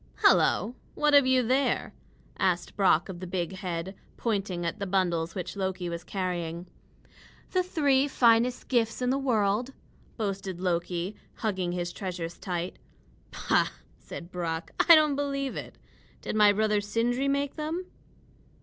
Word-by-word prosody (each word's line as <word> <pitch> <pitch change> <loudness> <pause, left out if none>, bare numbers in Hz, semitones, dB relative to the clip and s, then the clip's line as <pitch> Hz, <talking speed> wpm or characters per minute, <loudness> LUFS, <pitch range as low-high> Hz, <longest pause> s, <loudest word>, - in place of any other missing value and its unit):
"Hello! 215 +6 +4 0.2
what 300 -1 +2
have 285 -2 +7
you 260 -1 +4
there?" 260 +4 +1 0.5
asked 180 -2 0
Brock 185 -4 +3
of 185 -3 -7
the 185 - -6
big 175 -1 -2
head, 180 0 -4 0.2
pointing 195 -6 -1
at 170 +6 -3
the 200 - -3
bundles 175 -3 0
which 185 0 -4
Loki 190 -2 -2
was 170 0 -5
carrying. 175 -3 -3 0.9
"The 370 - +3
three 285 -6 +2
finest 240 -1 +3
gifts 235 -1 +1
in 250 - +2
the 270 - +1
world," 235 -1 +1 0.4
boasted 195 -4 -3
Loki, 175 +1 -1 0.2
hugging 185 -5 -2
his 175 -1 -3
treasures 175 -3 -5
tight. 175 -1 -4 0.5
"Pooh!" - - +2 0.3
said 175 +1 -9
Brock, 165 -2 -3 0.2
"I 335 - +12
don't 305 -2 +4
believe 275 -1 -2
it. - - -7 0.4
Did - - -4
my 210 -1 +6
brother 210 0 +1
Sindri 235 +6 0
make 280 0 0
them?" 320 +4 -3
200 Hz, 145 wpm, -28 LUFS, 180-255 Hz, 0.9 s, I